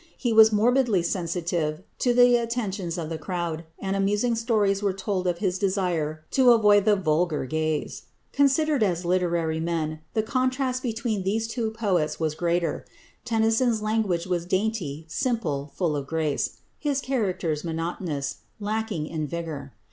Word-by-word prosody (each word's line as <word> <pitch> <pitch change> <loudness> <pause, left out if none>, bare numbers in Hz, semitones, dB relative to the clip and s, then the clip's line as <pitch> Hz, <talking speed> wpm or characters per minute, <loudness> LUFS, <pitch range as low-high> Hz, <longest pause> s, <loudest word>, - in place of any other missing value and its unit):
He 240 -4 0
was 220 0 +8
morbidly 225 -2 +3
sensitive 170 -2 -2 0.2
to 245 - +2
the 245 0 +6
attentions 215 -7 -2
of 160 -2 -4
the 160 -1 -4
crowd, 170 -1 -3
and 195 0 -2
amusing 205 +4 +1
stories 215 -4 +1
are 200 -1 +1
told 190 -1 -2
of 175 -1 0
his 185 -1 -1
desire 175 -6 -1
to 255 -2 +6
avoid 205 -3 +5
the 210 -1 +5
"vulgar" 160 -4 0
gaze. 155 +2 -2 0.3
Considered 285 0 +3
as 180 -4 +1
literary 170 -3 +1
men, 160 -2 -2 0.2
the 220 - +2
contrast 255 +2 0
between 225 -4 -2
these 220 +4 -1 0.2
poets 190 -9 0
was 160 -2 0
greater. 170 +1 -1 0.4
Tennyson's 225 0 +2
language 215 -6 0
was 175 -2 -2
dainty, 185 -7 -1
simple, 160 - -2
full 170 -5 0
of 140 -1 -4
grace; 155 -3 -1 0.2
his 285 -2 0
characters 190 - -1
monotonous, 165 -4 -3 0.2
lacking 210 -5 -2
in 155 -1 -3
vigour. 155 -4 -5
185 Hz, 145 wpm, -25 LUFS, 165-225 Hz, 0.4 s, was